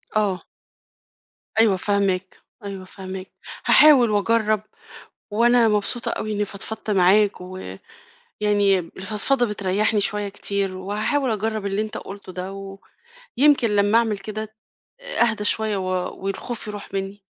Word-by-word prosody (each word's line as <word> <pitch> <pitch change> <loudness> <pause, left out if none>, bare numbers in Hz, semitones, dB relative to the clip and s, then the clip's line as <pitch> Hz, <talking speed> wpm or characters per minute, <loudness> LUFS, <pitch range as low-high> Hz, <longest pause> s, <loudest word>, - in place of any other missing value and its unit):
آه. 200 -4 +1 1.2
أيوه 215 -4 +5
فاهماك، 195 -1 0 0.3
أيوه 195 -2 -6
فاهماك. 190 0 -8 0.3
هاحاول 275 -7 +7
وأجرّب، 215 +1 +2 0.7
وأنا 235 +2 +4
مبسوطة 215 +3 0
أوي 215 - -3
إنّي 210 0 0
فضفضت 215 +2 -6
معاك، 195 +1 +4 0.8
ويعني 205 -2 +1
الفضفضة 210 +9 -1
بتريّحني 210 0 0
شوية 205 0 -1
كتير، 200 -1 -2
وهاحاول 215 +8 -1
أجرّب 215 0 -2
اللي 200 +1 0
أنت 215 0 -4
قُلته 195 -1 -9
ده، 185 +1 -5 0.9
ويمكن 280 -4 +5
لمّا 205 +1 +4
أعمل 225 -3 0
كده 215 +2 -5 0.5
أهدى 235 - 0
شوية 215 0 +1
و 185 -1 -2 0.3
والخوف 205 +5 -4
يروح 205 -1 -8
منّي. 195 +1 -4
205 Hz, 120 wpm, -23 LUFS, 195-220 Hz, 1.2 s, هاحاول